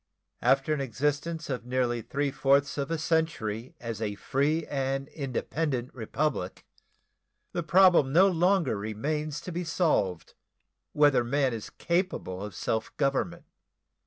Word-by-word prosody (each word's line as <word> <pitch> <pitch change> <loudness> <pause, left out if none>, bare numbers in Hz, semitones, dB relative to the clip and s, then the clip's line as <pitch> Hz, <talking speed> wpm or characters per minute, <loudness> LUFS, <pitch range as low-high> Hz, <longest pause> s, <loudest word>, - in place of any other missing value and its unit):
After 135 +3 +3
an 150 - -1
existence 150 +6 -2
of 125 -4 -3
near 125 -1 0
three 140 +5 -2
fourths 140 +1 +2
of 140 - -2
a 165 - 0
century 150 -8 -1
as 115 -2 -5
a 105 -2 -2
free 145 +9 0
and 135 0 -2
independent 135 -1 -3
Republic, 120 -3 -2 0.9
the 175 - -2
problem 175 -5 +5
no 180 +6 +6
longer 180 - +2
remains 145 +9 -3
to 180 - -7
be 175 +1 -3
solved 155 - 0 0.6
whether 145 -4 +4
man 135 +1 +1
is 110 -2 -6
capable 170 - -2
of 105 -3 -7
self 110 +2 -2
government. 140 -2 0
140 Hz, 130 wpm, -28 LUFS, 120-160 Hz, 0.9 s, no